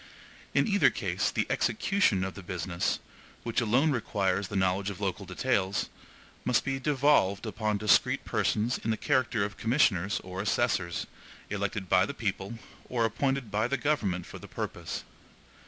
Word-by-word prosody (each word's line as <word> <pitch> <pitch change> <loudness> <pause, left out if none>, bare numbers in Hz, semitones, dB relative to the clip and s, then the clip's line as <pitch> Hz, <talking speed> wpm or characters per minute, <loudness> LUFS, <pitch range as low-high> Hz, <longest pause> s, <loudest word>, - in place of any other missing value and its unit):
In - - +4
either 200 -2 +5
case, - - -1
the - - 0
EXECUTION 195 - +2
of 95 -1 -3
the 100 - -9
business, 90 -1 -2 0.5
which 115 +1 0
alone 125 +7 +3
requires 100 -6 0
the 100 - -6
knowledge 95 +1 +1
of 100 - -7
local - - -3
details, 95 0 0 0.5
must 125 -2 +2
be 135 -1 -1
devolved 135 -8 +3
upon 110 -1 -1
discreet 105 0 +3
persons 115 +4 0
in - - -4
the 110 - +1
character 130 -7 +1
of 105 - -7
commissioners 105 - +2
or 95 +1 -5
assessors, 90 -4 0 0.5
elected 100 -1 -2
by 95 +2 +4
the 140 - -5
people 100 0 -3 0.3
or 120 -2 +1
appointed 135 0 -1
by 110 +3 +1
the 140 +2 0
government 105 - 0
for - - -9
the - - -11
purpose. - - -5
105 Hz, 155 wpm, -29 LUFS, 95-125 Hz, 0.5 s, either